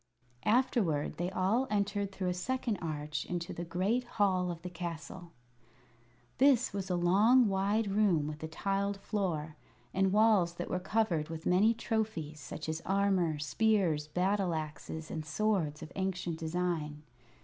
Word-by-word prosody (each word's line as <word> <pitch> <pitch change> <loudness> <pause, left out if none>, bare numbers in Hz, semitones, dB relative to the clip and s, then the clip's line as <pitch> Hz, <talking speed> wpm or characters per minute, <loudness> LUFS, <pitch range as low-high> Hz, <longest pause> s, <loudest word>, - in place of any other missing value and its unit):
Afterward 215 - +2
they 175 +1 -1
all 195 +8 +1
entered 200 -1 0
through 190 -2 -2
a - - 0
second 235 +4 -2
arch 150 -2 -3
into 175 -1 -4
the 170 - -5
great 190 +9 0
hall 185 -3 +2
of 170 -1 -6
the 180 - -4
castle. 170 0 -6 1.1
This 260 -4 +4
was 195 -1 -3
a 180 - +1
long, 210 +8 +5
wide 200 +3 +1
room 195 -6 +2
with 150 0 -6
a 160 - -3
tiled 195 +4 -1
floor, 165 -8 -2 0.4
and 190 0 +2
walls 205 -5 +4
that 175 - -5
were 180 - 0
covered 180 -6 0
with 160 0 -6
many 205 +6 +4
trophies, 215 -10 -2
such 150 +2 -7
as 160 +1 -3
armor, 190 -5 +1
spears, 160 0 +1
battle 185 +2 +1
axes, 155 +1 -6
and 160 - -3
swords 160 -3 0
of 155 - -9
ancient 185 -4 -2
design. 160 -3 -2
180 Hz, 150 wpm, -32 LUFS, 160-205 Hz, 1.1 s, long